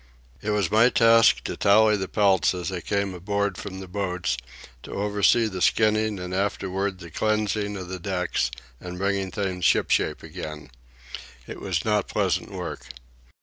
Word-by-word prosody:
It 105 - -4
was 105 -4 0
my 115 +3 +5
task 115 -2 +5
to - - -4
tally 105 +1 +5
the 95 -2 -3
pelts 95 -3 +2
as 90 0 -3
they 90 -2 -4
came 100 +1 -1
aboard 100 +2 -1
from 95 0 -7
the 95 - -8
boats, 90 -6 -2 0.5
to - - -9
oversee 105 +3 +2
the 95 -4 -4
skinning 110 0 +2
and 90 0 -6
afterward 95 0 -1
the 85 -3 -11
cleansing 105 +1 -1
of 90 -2 -7
the 95 0 -6
decks 90 -8 -1 0.3
and 90 0 -7
bringing 100 0 -1
things 95 -3 -3
ship - - +3
shape - - +1
again. 75 -3 -8 0.7
It - - -8
was 90 -5 -2
not 105 -2 +1
pleasant - - -1
work. - - -6
100 Hz, 165 wpm, -25 LUFS, 90-105 Hz, 0.7 s, my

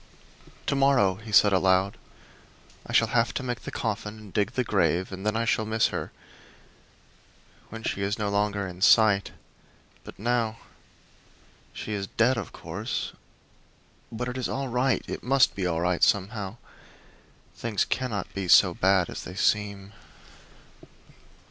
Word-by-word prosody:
"To - - 0
morrow," 135 -8 +3
he 110 +1 -10
said 105 -1 +6
aloud, 95 +1 +2 0.9
"I - - -7
shall 115 - +3
have 115 -3 +1
to - - -2
make 120 -2 -3
the - - -7
coffin 105 -1 -4
and 105 -3 -13
dig 105 -1 0
the 130 - 0
grave; 95 -4 +1
and 95 0 -7
then 105 - 0
I 115 +1 0
shall 110 - +1
miss 110 +1 +1
her, - - -5 1.6
when 115 0 -9
she 100 - -2
is 100 +2 -1
no 105 -2 -1
longer 100 0 0
in 90 -1 -9
sight; 105 -1 +5 0.7
but - - -12
now 115 0 0 1.1
she 110 - -6
is 100 -1 -3
dead, 120 +6 +2
of 115 -6 -5
course, - - -5 1.0
but 120 +2 -4
it 125 +1 -4
is 125 - -2
all 135 -1 -3
right 125 +1 +1
it - - -5
must 135 +1 +3
be 95 -2 -2
all 85 -1 -1
right, 90 0 0
somehow. 100 +1 +1 1.0
Things 110 -4 -1
cannot 115 -7 -3
be 95 -2 -4
so 90 0 +6
bad 95 -1 +2
as - - -7
they 90 - -9
seem." 100 0 0
105 Hz, 155 wpm, -26 LUFS, 95-115 Hz, 1.6 s, said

